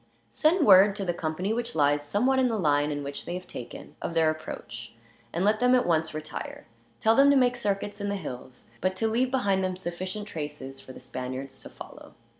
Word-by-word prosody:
"Send 320 +1 +3
word, 195 +1 +7
to 200 -2 -3
the 175 - 0
company 170 +5 -2
which 235 -6 -3
lies 145 -1 +3
somewhat 245 - +2
in 260 - +4
the 225 -2 0
line 145 -4 +1
which 140 0 -5
they 175 - -4
have 180 0 -6
taken, 125 -8 -9
of 170 - -4
their 160 -1 +4
approach; 120 -6 -8 0.4
and 175 +3 -1
let 215 +1 +3
them 250 +1 +5
at 250 - +3
once 160 -2 +1
retire. 155 0 -6 0.3
Tell 225 +1 +4
them 275 +2 +6
to 280 - +5
make 250 -1 +3
circuits 205 -2 -2
in 205 - -2
the 200 - -1
hills, 125 -8 -8
but 185 +1 0
to 225 - 0
leave 240 +4 +1
behind 200 -7 +1
them 185 -1 -1
sufficient 185 +4 -5
traces 145 -5 -6
for 130 - -11
the - - -11
Spaniards 130 +1 -6
to - - -9
follow. - - -12
185 Hz, 215 wpm, -27 LUFS, 145-220 Hz, 0.4 s, word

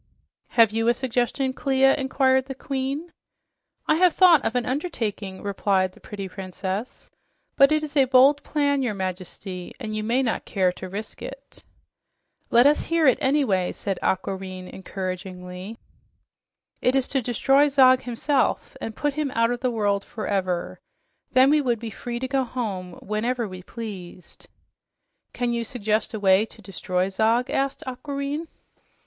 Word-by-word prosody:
"Have 225 -2 +7
you 225 +1 0
a 240 - +4
suggestion, 260 +1 -1
Clia?" 270 0 +3
inquired 265 -1 +2
the 270 0 -6
Queen. 275 +5 -3 0.7
"I 310 - +3
have 360 -1 +4
thought 345 -6 +6
of 230 - -1
an 245 - +1
undertaking," 225 - -3
replied 195 -2 +1
the - - -19
pretty 200 -2 -7
princess, 190 +3 -6 0.4
"but 275 +1 +6
it 310 0 +2
is 295 -1 -6
a 275 -2 +5
bold 265 +3 +5
plan, 285 -2 0
your 240 -5 -1
Majesty, 185 -1 -5
and 215 -4 -4
you 215 - -2
may 240 +5 +1
not 230 - -1
care 185 -3 +1
to 185 +1 -8
risk 210 +3 -7
it." - - -10 0.9
"Let 240 +2 +5
us 295 +1 +4
hear 330 -1 +2
it, 260 - +5
anyway," 260 -10 +2
said 195 -2 -3
Aquareine 190 -1 -2
encouragingly. 185 +1 -6 1.0
"It 250 - +2
is 265 -1 +2
to 270 - 0
destroy 270 +4 +3
Zog 260 -2 +5
himself 255 +4 -1
and 225 - -5
put 290 -1 -1
him 300 -1 -1
out 230 +1 +3
of 245 - -2
the 255 - 0
world 205 -4 0
forever. 190 -5 -2 0.5
Then 260 +2 +6
we 300 0 +4
would 245 -4 0
be 225 0 -6
free 235 +3 -5
to 260 +2 -3
go 270 0 +1
home 205 -8 -4
whenever 230 +3 -1
we 185 -1 -9
pleased." 185 -5 -9 0.8
"Can 240 -1 -1
you 235 0 -1
suggest 220 -1 -1
a - - -4
way 195 +2 +4
to - - -16
destroy 185 0 -2
Zog?" 225 +5 +1
asked 275 0 -1
Aquareine. 280 +4 -4
235 Hz, 160 wpm, -24 LUFS, 195-270 Hz, 1.0 s, Have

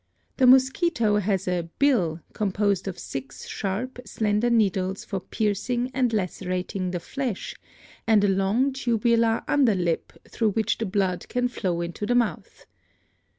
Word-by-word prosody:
The 255 - +5
mosquito 260 - +4
has 195 -2 0
a 175 -2 -1
'bill' 185 - +2
composed 200 -1 0
of 190 - -4
six 135 0 -7
sharp, 220 +6 -3
slender 215 +1 0
needles 195 -4 +1
for 195 - -3
piercing 240 +6 -1
and 255 -3 +1
lacerating 185 -2 -2
the 180 -1 -3
flesh 245 +3 -4 0.5
and 215 -2 +5
a - - +4
long 200 +8 +1
tubular 230 -2 +1
under 260 -8 +3
lip 175 -3 -1 0.2
through 220 -3 0
which 220 0 0
the 225 - -1
blood 190 -2 -1
can 245 0 +1
flow 185 -8 -2
into 170 +4 -4
the 245 - +2
mouth. 240 -2 -1
210 Hz, 145 wpm, -25 LUFS, 185-240 Hz, 0.5 s, The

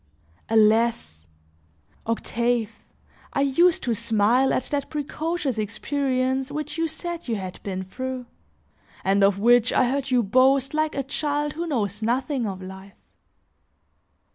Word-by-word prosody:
Alas! 220 - +2 0.8
Octave, 230 0 0 0.6
I 275 - +1
used 320 +6 +3
to 240 - 0
smile 230 +3 +2
at - - +1
that 285 -1 -1
precocious 300 -3 -2
experience 260 +4 -1
which 300 +1 -4
you 330 0 0
said 340 +1 -6
you 230 - 0
had 185 -3 -6
been 190 -2 -4
through, 255 +6 -5 0.8
and 195 +1 +3
of 195 0 +4
which 240 +3 +4
I 250 - +3
heard 275 -1 -2
you 250 -2 +3
boast 260 +6 +3
like 310 0 0
a 275 - -1
child 295 +2 -2
who 340 +2 -4
knows 210 - -2
nothing 250 +2 0
of 190 -1 -6
life. 190 +1 -10
255 Hz, 135 wpm, -24 LUFS, 215-280 Hz, 0.8 s, of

